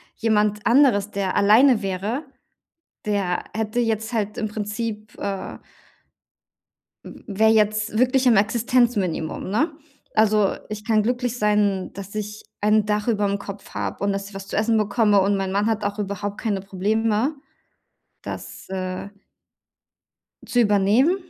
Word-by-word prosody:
Jemand 210 Hz, -2 st, +1 dB
anderes, 235 Hz, -6 st, +4 dB
der 195 Hz, -2 st, -2 dB
alleine 225 Hz, +3 st, +5 dB
wäre, 200 Hz, -, -3 dB, 0.8 s
der 195 Hz, -4 st, 0 dB
hätte 220 Hz, +2 st, -1 dB
jetzt 225 Hz, 0 st, -1 dB
halt 210 Hz, -2 st, -2 dB
im 215 Hz, -, -1 dB
Prinzip, 215 Hz, 0 st, -5 dB
äh 195 Hz, -1 st, -4 dB, 1.5 s
w -, -, -11 dB
wäre 220 Hz, +1 st, +3 dB
jetzt 215 Hz, 0 st, +1 dB
wirklich 255 Hz, +1 st, +3 dB
im 240 Hz, -3 st, +6 dB
Existenzminimum, 210 Hz, -6 st, +1 dB
ne? 250 Hz, -, +1 dB, 0.4 s
Also, 215 Hz, -2 st, +3 dB, 0.2 s
ich 210 Hz, 0 st, -6 dB
kann 220 Hz, -2 st, +3 dB
glücklich 245 Hz, +1 st, -1 dB
sein, 210 Hz, -3 st, +1 dB
dass 200 Hz, 0 st, -9 dB
ich 210 Hz, 0 st, -5 dB, 0.2 s
ein 210 Hz, 0 st, +3 dB
Dach 210 Hz, +1 st, 0 dB
überm 205 Hz, -3 st, +1 dB
Kopf 200 Hz, 0 st, -9 dB
habe -, -, -4 dB
und 200 Hz, 0 st, +1 dB
dass 195 Hz, 0 st, -4 dB
ich 205 Hz, -, -16 dB
was 195 Hz, 0 st, -8 dB
zu -, -, -4 dB
essen 220 Hz, +1 st, +2 dB
bekomme 210 Hz, 0 st, +3 dB
und 200 Hz, +1 st, +2 dB
mein 190 Hz, -1 st, -2 dB
Mann 200 Hz, +2 st, +1 dB
hat 220 Hz, -2 st, 0 dB
auch 205 Hz, +1 st, -2 dB
überhaupt 205 Hz, 0 st, -4 dB
keine 210 Hz, -4 st, -1 dB
Probleme, 215 Hz, +7 st, 0 dB, 0.9 s
dass -, -, -8 dB
äh 185 Hz, +1 st, -4 dB, 1.3 s
Zu 245 Hz, -, +1 dB
übernehmen. 215 Hz, -, +3 dB
210 Hz, 140 wpm, -23 LUFS, 200-225 Hz, 1.5 s, im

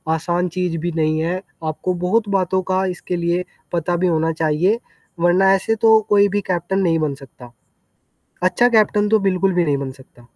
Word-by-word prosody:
आसान 175 Hz, +2 st, -1 dB
चीज़ 175 Hz, -2 st, -1 dB
भी 175 Hz, +2 st, -3 dB
नहीं 155 Hz, 0 st, +1 dB
है। 175 Hz, +3 st, -2 dB, 0.2 s
आपको 155 Hz, +4 st, -2 dB
बहुत 220 Hz, +1 st, +1 dB
बातों 185 Hz, +1 st, 0 dB
का 190 Hz, +1 st, +1 dB
इसके 180 Hz, -, -5 dB
लिए 170 Hz, +1 st, -1 dB, 0.3 s
पता 175 Hz, +1 st, 0 dB
भी 180 Hz, +1 st, +1 dB
होना 165 Hz, -1 st, +1 dB
चाहिए 175 Hz, +9 st, +1 dB, 0.4 s
वरना 185 Hz, +3 st, +4 dB
ऐसे 210 Hz, +3 st, 0 dB
तो 220 Hz, 0 st, +5 dB
कोई 205 Hz, 0 st, +5 dB
भी 205 Hz, +1 st, -1 dB
कैप्टन 180 Hz, +3 st, -1 dB
नहीं 165 Hz, -4 st, +1 dB
बन 150 Hz, -3 st, -1 dB
सकता। 120 Hz, -1 st, -14 dB, 0.9 s
अच्छा 185 Hz, +7 st, +3 dB
कैप्टन 210 Hz, -2 st, +2 dB
तो 220 Hz, 0 st, +4 dB
बिल्कुल 195 Hz, 0 st, +1 dB
भी 175 Hz, -1 st, +2 dB
नहीं 145 Hz, -2 st, 0 dB
बन 135 Hz, -1 st, -4 dB
सकता। 125 Hz, -2 st, -19 dB
180 Hz, 185 wpm, -19 LUFS, 160-195 Hz, 0.9 s, तो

